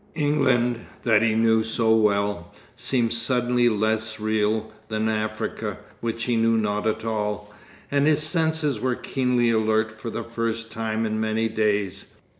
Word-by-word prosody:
England, 130 Hz, -6 st, +2 dB, 0.2 s
that 110 Hz, -3 st, +4 dB
he 115 Hz, -1 st, +2 dB
knew 110 Hz, 0 st, +3 dB
so 110 Hz, 0 st, +2 dB
well, 100 Hz, -4 st, +1 dB, 0.2 s
seemed 120 Hz, -4 st, +1 dB
suddenly 120 Hz, +1 st, +2 dB
less 110 Hz, 0 st, -1 dB
real 110 Hz, 0 st, 0 dB, 0.2 s
than 110 Hz, 0 st, -1 dB
Africa, 110 Hz, 0 st, -3 dB, 0.2 s
which 115 Hz, 0 st, -3 dB
he 120 Hz, 0 st, 0 dB
knew 115 Hz, 0 st, +3 dB
not 105 Hz, 0 st, -1 dB
at 110 Hz, +1 st, -2 dB
all, 105 Hz, -1 st, -3 dB, 0.4 s
and 140 Hz, +1 st, +2 dB
his 155 Hz, 0 st, +3 dB
senses 160 Hz, -5 st, +1 dB
were 125 Hz, +1 st, 0 dB
keenly 125 Hz, -3 st, 0 dB
alert 110 Hz, 0 st, +1 dB
for 110 Hz, +1 st, -7 dB
the 115 Hz, -, -4 dB
first 115 Hz, 0 st, -3 dB
time 110 Hz, 0 st, -2 dB
in 110 Hz, 0 st, -2 dB
many 110 Hz, +1 st, 0 dB
days. 100 Hz, -3 st, -1 dB
110 Hz, 150 wpm, -24 LUFS, 110-120 Hz, 0.4 s, that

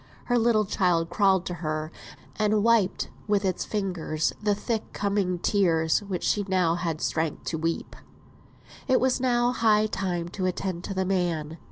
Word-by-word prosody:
Her 245 Hz, -1 st, +2 dB
little 225 Hz, -2 st, +3 dB
child 175 Hz, -4 st, +1 dB
crawled 190 Hz, -1 st, +3 dB
to 180 Hz, -, -3 dB
her, 155 Hz, 0 st, -3 dB, 0.4 s
and 210 Hz, -1 st, +2 dB
wiped 230 Hz, -5 st, +2 dB, 0.2 s
with 205 Hz, -1 st, +1 dB
its 185 Hz, -2 st, -1 dB
fingers 180 Hz, -7 st, -1 dB
the 210 Hz, -1 st, +2 dB
thick 220 Hz, +1 st, -3 dB
coming 200 Hz, -3 st, 0 dB
tears 165 Hz, -4 st, +2 dB
which 195 Hz, -4 st, -5 dB
she 205 Hz, -, +1 dB
now 180 Hz, -3 st, +2 dB
had 170 Hz, -2 st, -3 dB
strength 160 Hz, -1 st, -1 dB
to 160 Hz, -, -3 dB
weep. 165 Hz, +1 st, -2 dB, 0.9 s
It 260 Hz, -1 st, +4 dB
was 255 Hz, 0 st, +1 dB
now 245 Hz, -1 st, +2 dB
high 215 Hz, -3 st, +3 dB
time 180 Hz, -5 st, -2 dB
to 185 Hz, +1 st, -2 dB
attend 185 Hz, -1 st, -3 dB
to 195 Hz, -, -5 dB
the 190 Hz, 0 st, 0 dB
man. 170 Hz, -4 st, -1 dB
190 Hz, 165 wpm, -26 LUFS, 170-210 Hz, 0.9 s, It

